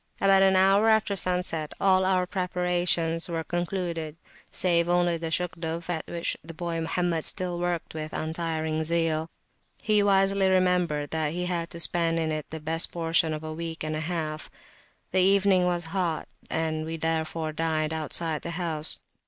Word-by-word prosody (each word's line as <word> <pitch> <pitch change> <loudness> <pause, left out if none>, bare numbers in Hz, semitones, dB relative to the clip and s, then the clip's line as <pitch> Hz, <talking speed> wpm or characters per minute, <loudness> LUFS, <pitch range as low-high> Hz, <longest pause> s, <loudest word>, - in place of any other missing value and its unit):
About 195 -1 +5
an 190 0 +5
hour 195 +4 +5
after 220 -2 +2
sunset 180 -4 -1
all 190 -1 +4
our 185 -1 +2
preparations 180 -2 +1
were 165 -1 -2
concluded, 170 -3 -3 0.3
save 170 -2 +1
only 175 -1 +2
the 165 0 -4
Shugduf, 170 0 -3
at 160 -2 -4
which 170 -1 -2
the 165 +1 -9
boy 170 0 -3
Mohammed 165 0 -1
still 180 -1 -1
worked 175 -1 -2
with 155 0 -5
untiring 160 -1 -2
zeal; 165 -1 0 0.5
he 215 -1 +2
wisely 195 -1 +3
remembered 180 -6 +1
that 155 -1 -1
he 180 +1 -2
had 170 -2 -2
to 170 - -8
spend 170 -1 +2
in 160 -1 0
it 155 -1 -4
the 160 - -6
best 160 +2 +1
portion 165 -1 +2
of 155 0 -4
a 155 0 -5
week 165 0 -5
and 155 0 -2
a - - -2
half. 155 -2 -4 0.6
The 185 - +2
evening 195 -1 +4
was 175 -1 0
hot, 175 -5 -1 0.2
we 160 0 -2
therefore 160 0 -2
dined 155 -1 -1
outside 160 0 -1
the - - -5
house. 160 -4 +1
170 Hz, 165 wpm, -27 LUFS, 160-180 Hz, 0.6 s, About